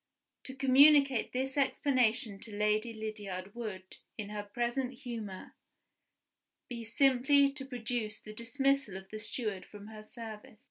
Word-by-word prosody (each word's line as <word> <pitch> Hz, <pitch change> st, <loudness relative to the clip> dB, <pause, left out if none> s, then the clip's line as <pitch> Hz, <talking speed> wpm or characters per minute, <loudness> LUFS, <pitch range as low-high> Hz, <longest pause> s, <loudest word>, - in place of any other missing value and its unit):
To 265 Hz, -, -6 dB
communicate 275 Hz, -1 st, +5 dB
this 265 Hz, +2 st, -1 dB
explanation 245 Hz, -6 st, +2 dB
to 220 Hz, -1 st, -8 dB
Lady 210 Hz, +2 st, +1 dB
Lydiard 205 Hz, -3 st, -6 dB
would, 205 Hz, -6 st, -7 dB, 0.2 s
in 205 Hz, -2 st, -5 dB
her 210 Hz, 0 st, -4 dB
present 240 Hz, +5 st, -2 dB
humor, 230 Hz, -7 st, -7 dB, 1.1 s
be 235 Hz, -2 st, -6 dB
simply 275 Hz, +3 st, +4 dB
to 275 Hz, -1 st, -6 dB
produce 235 Hz, -3 st, -3 dB
the 215 Hz, -, -10 dB
dismissal 270 Hz, -2 st, 0 dB
of 190 Hz, 0 st, -11 dB
the 215 Hz, -, -5 dB
steward 215 Hz, -3 st, -3 dB
from 205 Hz, 0 st, -12 dB
her 215 Hz, -1 st, -9 dB
service. 220 Hz, -1 st, -9 dB
230 Hz, 135 wpm, -32 LUFS, 210-265 Hz, 1.1 s, communicate